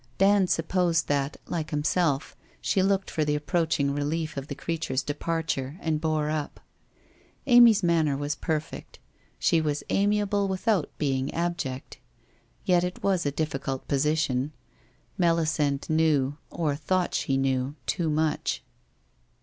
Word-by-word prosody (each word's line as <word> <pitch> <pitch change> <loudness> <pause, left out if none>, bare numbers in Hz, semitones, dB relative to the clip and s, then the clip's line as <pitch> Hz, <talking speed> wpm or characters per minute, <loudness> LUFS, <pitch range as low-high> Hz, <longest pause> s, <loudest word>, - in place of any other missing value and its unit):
Dand 195 -1 +4
supposed 165 0 +1
that, 140 0 0
like 160 -2 -3
himself, 150 -1 0 0.2
she 190 - +1
looked 195 0 +1
for 155 - 0
the 150 0 +1
approaching 150 -2 0
relief 155 +2 -2
of 135 0 -5
the 140 - -5
creature's 160 -5 -2
departure 150 -2 -2
and 155 -2 -1
bore 155 -2 0
up. 150 -2 -3 0.9
Amy's 240 -5 +7
manner 160 -5 +2
was 145 +1 -2
perfect. 155 0 -4 0.4
She 165 - +3
was 150 -2 -1
amiable 205 0 +2
without 190 -2 0
being 135 -2 -1
abject. 165 -6 -3 0.7
Yet 180 -1 +3
it 180 0 -4
was 185 -6 +1
a - - +1
difficult 135 -3 -3
position. 145 -1 0 0.7
Melisande 155 -5 +1
knew, 150 -4 +2
or 155 -4 -1
thought 180 +5 0
she 135 - 0
knew, 135 +1 0
too 165 -2 0
much. 155 0 0
155 Hz, 130 wpm, -27 LUFS, 145-175 Hz, 0.9 s, Amy's